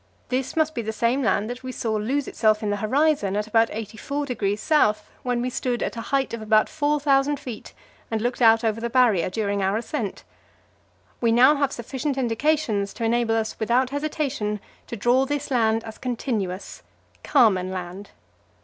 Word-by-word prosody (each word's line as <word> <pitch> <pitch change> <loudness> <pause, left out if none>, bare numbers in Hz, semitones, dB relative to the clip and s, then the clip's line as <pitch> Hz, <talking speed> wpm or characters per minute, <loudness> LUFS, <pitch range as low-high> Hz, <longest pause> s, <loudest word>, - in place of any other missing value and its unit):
This 255 0 -2
must 315 -1 +1
be 235 - -2
the 220 -1 -3
same 235 +5 +1
land 215 -3 +1
that 245 +1 -6
we 255 0 -6
saw 225 -3 -2
lose 250 +7 -1
itself 215 -1 +1
in 205 - 0
the 205 - -1
horizon 255 -2 +1
in 210 - 0
about 225 +1 +3
84°S., 220 +1 0 0.2
when 245 -1 -1
we 250 - -2
stood 245 -1 -2
at - - -3
a 230 - -4
height 270 +2 -1
of 230 - -4
about 215 0 +3
4,000 290 -2 +1
feet 250 -6 -8 0.4
and 225 - -1
looked 240 +3 -2
out 225 0 +6
over 225 0 0
the 235 - -2
Barrier, 235 -9 +3
during 200 0 -1
our 195 +2 +1
ascent. 230 -3 -4 1.0
We 230 -1 +3
now 250 +5 +6
have 280 -1 +1
sufficient 265 +4 -4
indications 235 -4 0
to - - -5
enable 230 0 +1
us 220 -1 -2
without 245 +4 +1
hesitation 280 -8 -2 0.3
to - - -5
draw 245 +5 +2
this 290 0 -3
land 225 -2 +2
as 220 -1 -9
continuous 220 -7 -3 0.4
Carmen 190 -5 +3
Land. 185 +2 -6
235 Hz, 175 wpm, -24 LUFS, 215-270 Hz, 1.0 s, out